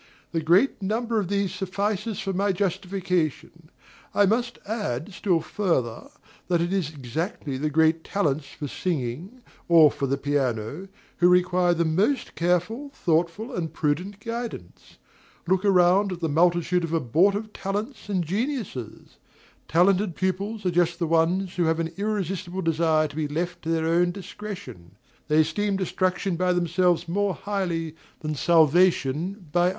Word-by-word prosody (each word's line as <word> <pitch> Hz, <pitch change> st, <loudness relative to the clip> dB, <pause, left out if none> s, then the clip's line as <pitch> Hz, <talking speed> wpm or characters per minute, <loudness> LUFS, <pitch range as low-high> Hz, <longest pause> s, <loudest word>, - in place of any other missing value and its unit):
The 165 Hz, -, -1 dB
great 185 Hz, -, +3 dB
number 225 Hz, +3 st, 0 dB
of 200 Hz, -, -2 dB
these 200 Hz, -1 st, -1 dB
suffices 200 Hz, +3 st, -2 dB
for 195 Hz, -2 st, -2 dB
my 200 Hz, +2 st, +1 dB
justification. 180 Hz, -4 st, -2 dB, 0.5 s
I 205 Hz, -, +5 dB
must 235 Hz, +4 st, 0 dB
add, 205 Hz, -, -3 dB
still 180 Hz, -3 st, +1 dB
further, 145 Hz, -, -1 dB, 0.4 s
that 175 Hz, -2 st, +2 dB
it 175 Hz, +2 st, -1 dB
is 185 Hz, -7 st, 0 dB
exactly 150 Hz, -, -4 dB
the 150 Hz, +4 st, -1 dB
"great 160 Hz, +2 st, +3 dB
talents" 150 Hz, -8 st, -1 dB
for 145 Hz, +1 st, -7 dB
singing, 160 Hz, -, -4 dB, 0.2 s
or 160 Hz, -4 st, +7 dB
for 140 Hz, -, -2 dB
the 135 Hz, +1 st, 0 dB
piano, 135 Hz, -, -2 dB, 0.3 s
who 175 Hz, -, +5 dB
require 180 Hz, -1 st, +3 dB
the 170 Hz, 0 st, +1 dB
most 200 Hz, -, +1 dB
careful, 180 Hz, -, 0 dB
thoughtful, 175 Hz, +9 st, 0 dB
and 165 Hz, -3 st, -3 dB
prudent 180 Hz, +7 st, -1 dB
guidance. 230 Hz, -, -7 dB, 0.5 s
Look 190 Hz, +2 st, +1 dB
around 190 Hz, 0 st, +4 dB
at 180 Hz, -, -5 dB
the 165 Hz, -, -1 dB
multitude 175 Hz, +3 st, +2 dB
of 165 Hz, 0 st, -3 dB
abortive 195 Hz, -, +1 dB
talents 210 Hz, +5 st, -4 dB
and 185 Hz, -3 st, 0 dB
geniuses! 200 Hz, -, -4 dB, 0.5 s
Talented 180 Hz, +2 st, +3 dB
pupils 200 Hz, +3 st, -2 dB
are 180 Hz, -, +2 dB
just 170 Hz, 0 st, +2 dB
the 170 Hz, -, -1 dB
ones 170 Hz, +4 st, +1 dB
who 175 Hz, -, +2 dB
have 160 Hz, 0 st, +1 dB
an 165 Hz, -1 st, -2 dB
irresistible 190 Hz, -3 st, -3 dB
desire 160 Hz, -1 st, +2 dB
to 145 Hz, -, -13 dB
be 155 Hz, -1 st, -1 dB
left 170 Hz, +4 st, -3 dB
to 160 Hz, -, -5 dB
their 165 Hz, -1 st, +1 dB
own 170 Hz, +2 st, +3 dB
discretion; 175 Hz, -, -8 dB, 0.3 s
they 155 Hz, +1 st, +4 dB
esteem 205 Hz, +5 st, 0 dB
destruction 185 Hz, -1 st, -1 dB
by 180 Hz, +1 st, +2 dB
themselves 175 Hz, 0 st, +1 dB
more 195 Hz, +1 st, 0 dB
highly 170 Hz, -6 st, -3 dB, 0.3 s
than 155 Hz, 0 st, -2 dB
salvation 170 Hz, +3 st, +2 dB
by 175 Hz, +1 st, +3 dB
others. -, -, +3 dB
175 Hz, 150 wpm, -25 LUFS, 160-195 Hz, 0.5 s, or